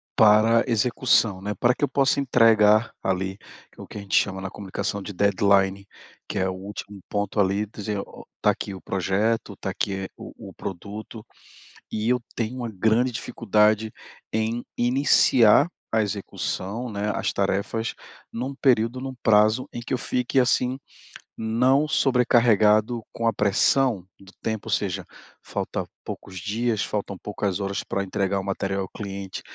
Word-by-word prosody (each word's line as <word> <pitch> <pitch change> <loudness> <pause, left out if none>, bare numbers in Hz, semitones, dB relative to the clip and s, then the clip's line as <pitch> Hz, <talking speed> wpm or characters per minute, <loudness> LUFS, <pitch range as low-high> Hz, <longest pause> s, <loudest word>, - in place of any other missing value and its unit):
para 110 +1 +5
execução, 115 -3 +2
né. 105 +1 -3
Para 120 0 +4
que - - -6
eu - - +4
possa 135 0 +2
entregar 115 -4 +4
ali 95 +1 -1 0.4
o - - -9
que - - -9
a 105 - -5
gente 100 - -2
chama 95 -1 +2
na 95 - -4
comunicação 100 +1 -4
de 105 - -6
deadline 100 0 +2 0.4
que - - -2
é 95 0 +1
o - - -3
último 100 +1 -8
ponto 105 +1 -2
ali 100 +1 +2
dize 105 0 -5
o, 100 - -8
está - - +1
aqui 100 - -5
o 95 - -9
projeto, 100 +3 -1
está 95 - -5
aqui 95 0 -3
o - - -10 0.2
o - - -14
produto, 105 +4 -7 0.7
e 110 +2 -2
eu 125 -1 +2 0.2
tenho 120 +2 -2
uma 120 -2 -4
grande 110 +5 +2
dificuldade 110 -1 +1 0.4
em 110 +2 -1
iniciar 125 +1 +5 0.2
a 110 - +3
execução, 105 +2 -4
né. 105 0 -2
As - - -1
tarefas, 100 +3 -1 0.4
em 115 - -4
um 140 - -5
período, 125 -2 +2
em 135 - -5
um 130 - -5
prazo 110 +5 +4
em 120 - -5
que 120 - -6
eu - - 0
fique 125 +2 -1
assim, 125 +1 +1 0.6
não 125 +6 +2
sobrecarregado 120 -4 +3
com 115 0 -2
a 115 - +3
pressão 105 +1 +2
do 95 0 -15
tempo, 110 -1 -3
ou - - -4
seja, 100 -4 -1 0.4
falta - - -3 0.2
poucos 95 -2 -8
dias, 110 +2 -1
faltam 100 -2 -3
poucas 100 -2 -3
horas 100 -1 -2
para 100 - -2
entregar 95 0 -1
o - - -5
material 95 0 -2
ao 95 - -5
cliente. 100 -2 -6
105 Hz, 160 wpm, -24 LUFS, 100-120 Hz, 0.7 s, para